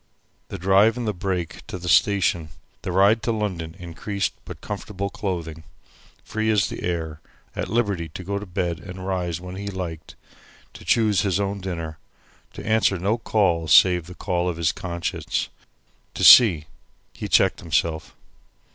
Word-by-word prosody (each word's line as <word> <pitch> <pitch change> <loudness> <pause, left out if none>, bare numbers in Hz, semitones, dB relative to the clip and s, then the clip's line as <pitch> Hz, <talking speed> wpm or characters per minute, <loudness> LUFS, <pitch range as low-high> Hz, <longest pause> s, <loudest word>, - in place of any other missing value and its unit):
The - - -6
drive 100 +5 +4
in 120 - -3
the 105 - -1
brake 90 -2 -3
to - - -5
the 90 0 -8
station, 90 -4 +3 0.3
the 90 - -4
ride 100 +5 +4
to 115 - -1
London 95 -7 -3
in 85 -1 -9
creased, 100 +3 -2
but - - -9
comfortable 100 -1 -5
clothing, 80 -5 -4 0.6
free 110 +1 -2
as 105 -3 +2
the - - -7
air, 80 -3 -3 0.3
at - - -3
liberty 100 -7 0
to 95 - -6
go 100 +2 -3
to 105 - -9
bed 90 -2 -2
and 95 0 -9
rise 90 -3 -2
when 90 +1 -8
he 100 +1 -6
liked, 85 -5 -6 0.6
to - - -12
choose 110 -4 +3
his 100 -3 0
own 100 0 -2
dinner, 80 -4 -5 0.5
to - - -9
answer 110 -3 +2
no 100 +7 0
call 90 -8 +1
save 90 +1 +5
the 90 - -10
call 90 0 -1
of 85 - -4
his 85 0 +1
conscience, 85 -2 -3 0.7
to - - -3
see 90 -11 +8 0.5
he - - -6
checked - - +3
himself. 80 -1 -1
95 Hz, 165 wpm, -23 LUFS, 85-100 Hz, 0.7 s, see